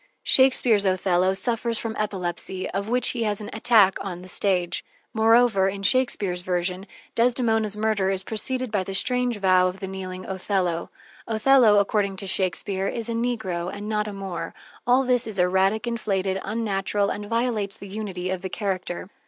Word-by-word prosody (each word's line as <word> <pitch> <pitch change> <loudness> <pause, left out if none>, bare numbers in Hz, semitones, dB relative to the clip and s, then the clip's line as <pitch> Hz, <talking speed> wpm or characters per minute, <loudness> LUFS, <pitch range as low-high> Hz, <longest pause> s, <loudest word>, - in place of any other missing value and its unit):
Shakespeare's 255 -5 +4
Othello 185 -1 +1
suffers 230 +3 -1
from 225 0 -4
epilepsy, 185 -2 -3
of 200 +3 -3
which 250 0 +3
he 240 - -2
has 210 -2 0
an 210 -1 -7
attack 215 -3 +4
on 180 -2 -6
the - - -11
stage; 180 -2 0 0.3
moreover, 225 -3 +4
in 195 0 -6
Shakespeare's 200 -5 +1
version, 180 +2 -2 0.3
Desdemona's 225 -3 +1
murder 210 -3 +1
is 190 -1 -1
preceded 255 +4 -2
by 205 -3 0
the 195 +1 -5
strange 250 +2 +1
vow 185 -2 +4
of 185 +1 -5
the 190 - -5
kneeling 185 -1 -6
Othello. 185 -3 -2 0.4
Othello, 225 -1 +5
according 200 -1 +1
to 195 - -6
Shakespeare, 190 +1 -1
is 230 +2 -4
a - - -1
negro 220 -7 -2
and 205 +1 -7
not 210 0 -1
a 210 - -5
Moor. 195 -3 -6 0.3
All 250 +2 +4
this 250 -2 +2
is 215 -3 -2
erratic, 190 +5 +2
inflated, 195 -5 -1
unnatural, 205 -2 -1
and 205 0 -5
violates 230 -3 -1
the 200 - -10
unity 190 -3 -4
of 185 -1 -3
the 190 - -5
character. 185 -3 -3
200 Hz, 170 wpm, -24 LUFS, 190-225 Hz, 0.4 s, Othello